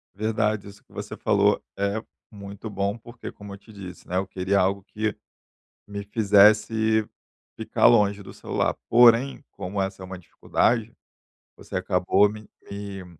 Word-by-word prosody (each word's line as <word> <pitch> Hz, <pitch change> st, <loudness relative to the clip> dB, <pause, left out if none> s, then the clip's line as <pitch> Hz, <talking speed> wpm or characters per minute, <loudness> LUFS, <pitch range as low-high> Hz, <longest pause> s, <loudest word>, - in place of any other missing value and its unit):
Verdade, 110 Hz, -1 st, -1 dB
isso 100 Hz, 0 st, -14 dB
que -, -, -30 dB
você -, -, -7 dB
falou -, -, +2 dB, 0.2 s
é 100 Hz, +2 st, -1 dB, 0.3 s
muito 100 Hz, +1 st, -9 dB
bom, 100 Hz, +2 st, -2 dB
porque 120 Hz, +1 st, -10 dB
como 100 Hz, -1 st, -11 dB
eu 100 Hz, -, -9 dB
te 110 Hz, +2 st, -18 dB
disse, 95 Hz, -3 st, -11 dB
né, 90 Hz, -, -2 dB
eu 95 Hz, +1 st, -1 dB
queria 95 Hz, +1 st, 0 dB
algo 95 Hz, +1 st, 0 dB
que 110 Hz, 0 st, -3 dB, 0.7 s
me 100 Hz, 0 st, -6 dB
fizesse 105 Hz, +1 st, +3 dB, 0.5 s
ficar -, -, 0 dB
longe 100 Hz, -3 st, +3 dB
do -, -, -11 dB
celular, -, -, -2 dB
porém, 120 Hz, +4 st, +5 dB
como 100 Hz, +2 st, -4 dB
essa 95 Hz, 0 st, -4 dB
é 95 Hz, -, -7 dB
uma 95 Hz, 0 st, -8 dB
dificuldade, 115 Hz, +5 st, -1 dB, 0.6 s
você -, -, -8 dB
acabou 90 Hz, +3 st, +2 dB
me 105 Hz, 0 st, -10 dB, 0.2 s
me 100 Hz, -1 st, -7 dB
100 Hz, 155 wpm, -24 LUFS, 100-110 Hz, 0.7 s, porém